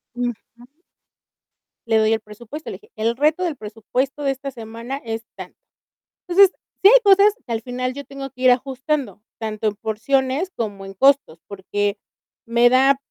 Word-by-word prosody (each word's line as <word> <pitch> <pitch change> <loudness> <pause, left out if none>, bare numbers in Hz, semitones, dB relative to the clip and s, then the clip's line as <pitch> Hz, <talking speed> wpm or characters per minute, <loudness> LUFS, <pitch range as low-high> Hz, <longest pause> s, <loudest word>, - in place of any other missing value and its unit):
Ujú. 245 0 -1 1.5
Le 225 -1 +3
doy 220 0 +3
el 220 - 0
presupuesto, 235 +8 -9
le - - -6
dije: 430 +3 -24
"El 230 +2 0
reto 305 +7 +2
del 340 -4 -1
presupuesto 245 +5 -3
de 275 - +2
esta 270 +1 -6
semana 230 +2 -7
es 225 0 -4
tanto". - - -10 0.7
Entonces 385 +2 +6 0.3
sí 390 - +9
hay - - +8
cosas 400 +1 +6
que 235 - -4
al 225 - -2
final 255 +1 -3
yo 285 +1 -7
tengo 275 -1 -8
que 255 0 -12
ir 255 - +7
ajustando, 260 - -1 0.2
tanto 220 -1 -2
en 210 - -4
porciones 265 - -1
como 205 -4 -4
en 195 0 -9
costos, 270 - +3
porque 205 +1 -2 0.5
me 235 +1 +4
da 265 +2 +4
245 Hz, 170 wpm, -21 LUFS, 220-275 Hz, 1.5 s, sí